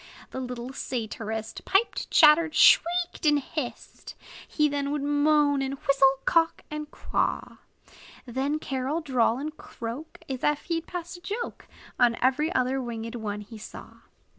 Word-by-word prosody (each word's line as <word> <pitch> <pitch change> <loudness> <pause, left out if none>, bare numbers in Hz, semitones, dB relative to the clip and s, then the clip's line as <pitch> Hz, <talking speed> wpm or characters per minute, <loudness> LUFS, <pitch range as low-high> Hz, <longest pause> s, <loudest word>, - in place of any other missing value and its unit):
The - - -5
little 250 0 -6
satirist 220 -3 -4
Piped, 395 +4 +1
chattered, 310 +1 +6
shrieked, 350 +1 +4
and 295 -2 +5
hissed; 280 -2 -7 0.3
He 300 -1 +2
then 285 -1 -2
would 295 -1 -2
moan, 290 -1 +3
and 270 0 -2
whistle, 275 -1 +4
quack, 330 -1 +2
and 300 0 -5
caw; - - -2 0.7
Then, 265 +4 -1
carol, 275 +2 -2
drawl, 250 -6 +2
and 300 +3 -5
croak, 240 +3 -8
As 265 -2 -5
if 295 0 +1
he 330 -1 -1
'd - - -31
pass 350 0 -6
a - - -16
joke 430 +6 -5 0.3
On 235 -1 +4
every 275 +6 +2
other 260 +1 +1
winged 230 -2 -5
one 210 -3 -4
he 215 +2 -11
saw. 215 - -11
275 Hz, 150 wpm, -27 LUFS, 245-310 Hz, 0.7 s, chattered